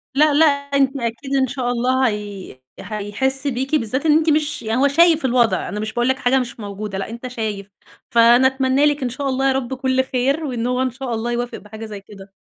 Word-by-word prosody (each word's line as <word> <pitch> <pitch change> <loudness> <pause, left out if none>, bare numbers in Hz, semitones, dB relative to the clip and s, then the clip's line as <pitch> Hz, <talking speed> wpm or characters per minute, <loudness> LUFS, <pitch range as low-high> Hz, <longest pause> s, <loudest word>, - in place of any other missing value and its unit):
لأ 300 +1 +4
لأ 310 +3 +5
أنتِ 280 -2 +1
أكيد 240 +3 -3
إن 265 -1 +2
شاء 250 -1 -2
الله 255 +2 +1
هي 205 - -6 0.2
هيحسْ 225 +7 -2
بيكِ، 265 +3 -1
بالذات 260 +1 -1
إن 305 -1 +5
أنتِ 320 0 +1
مش 300 0 0
يعني 225 +3 0
هو 280 - +5
شايف 325 +1 +4
الوضع. 240 -2 +1
أنا 210 - -4
مش 215 +1 -4
باقول 240 0 0
لك 260 0 +1
حاجة 260 +2 +2
مش 250 -1 -5
موجودة، 205 -1 -6
لأ 195 - -4
أنت 235 +3 -7
شايف. 215 -5 -5 0.4
فأنا 235 +2 +5
أتمنى 265 +1 +1
لِك 295 -1 +1
إن 250 - -1
شاء 275 +3 -3
الله 270 +1 0
يا - - +3
رب 265 -1 -3
كل 260 0 0
خير 265 +4 -1
وإن 245 -4 -2
هو 250 +1 0
إن 260 -1 0
شاء 255 0 -5
الله 230 +1 -2
يوافق 240 0 -3
بحاجة 220 +1 -10
زي 210 -2 -8
كده. 195 -1 -14
255 Hz, 225 wpm, -20 LUFS, 225-270 Hz, 0.4 s, لأ